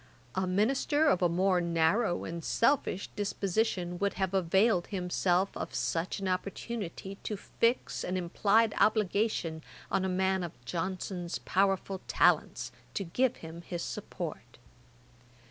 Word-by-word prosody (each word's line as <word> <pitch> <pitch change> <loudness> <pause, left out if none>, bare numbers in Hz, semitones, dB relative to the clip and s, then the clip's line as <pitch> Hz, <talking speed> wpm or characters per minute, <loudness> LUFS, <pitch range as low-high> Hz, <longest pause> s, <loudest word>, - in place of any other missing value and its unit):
A 190 -1 0
minister 260 +10 +2
of 230 -11 +3
a 175 - +4
more 180 +1 +2
narrow 170 +4 +2
and 170 0 -5
selfish 230 -6 +1
disposition 195 -3 -1
would 200 0 0
have 190 0 -1
availed 190 +1 +3
himself 180 0 0
of - - -5
such 165 +2 -1
an 195 - -3
opportunity 195 0 -4
to 210 - -3
fix 230 +5 0
an 185 +1 -1
implied 205 +5 +2
obligation 205 -6 +1 0.3
on 195 0 +2
a 190 - 0
man 190 +1 +1
of 170 - -5
Johnson's 180 +1 -3
powerful 195 0 0
talents - - +2 0.2
to 200 - -1
give 245 +8 +1
him 165 +1 -8
his 175 0 -5
support. - - -6
190 Hz, 130 wpm, -31 LUFS, 175-205 Hz, 0.3 s, a